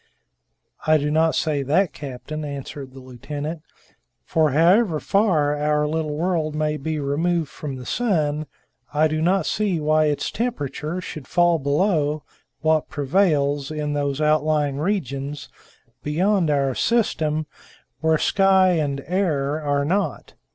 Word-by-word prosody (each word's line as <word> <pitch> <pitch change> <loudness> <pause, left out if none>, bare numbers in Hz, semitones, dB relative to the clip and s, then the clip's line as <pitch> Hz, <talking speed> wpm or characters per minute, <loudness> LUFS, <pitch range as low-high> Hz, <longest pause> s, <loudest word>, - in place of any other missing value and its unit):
"I 155 0 +6
do 150 0 -1
not 160 +1 +2
say 150 -3 0
that, 155 +7 +1
captain," 145 +2 -7
answered 140 -1 -7
the - - -9
lieutenant; 145 +5 -6 0.6
"for, 160 -1 +2
however 170 - +3
far 160 -9 +2
our 150 0 +1
little 155 -1 -2
world 160 -3 -1
may 155 0 0
be 155 +2 -3
removed 155 +2 0
from 145 -3 -6
the 125 -1 -9
sun, 155 - 0 0.4
I 150 +2 +3
do 155 0 -2
not 180 +1 +2
see 200 -5 0
why 155 +1 +3
its 145 -1 -1
temperature 180 - -3
should 155 -6 -8
fall 175 -1 +3
below 150 0 +1 0.4
what 155 -1 +2
prevails 145 -2 +1
in 150 -1 -3
those 145 -1 -1
outlying 150 -2 +1
regions 145 - -3 0.5
beyond 180 +3 +1
our 140 -2 +1
system 155 - 0 0.5
where 160 0 +2
sky 190 +1 +4
and 145 -5 0
air 155 -5 0
are 145 -1 0
not." 195 +6 -2
155 Hz, 135 wpm, -22 LUFS, 145-170 Hz, 0.6 s, I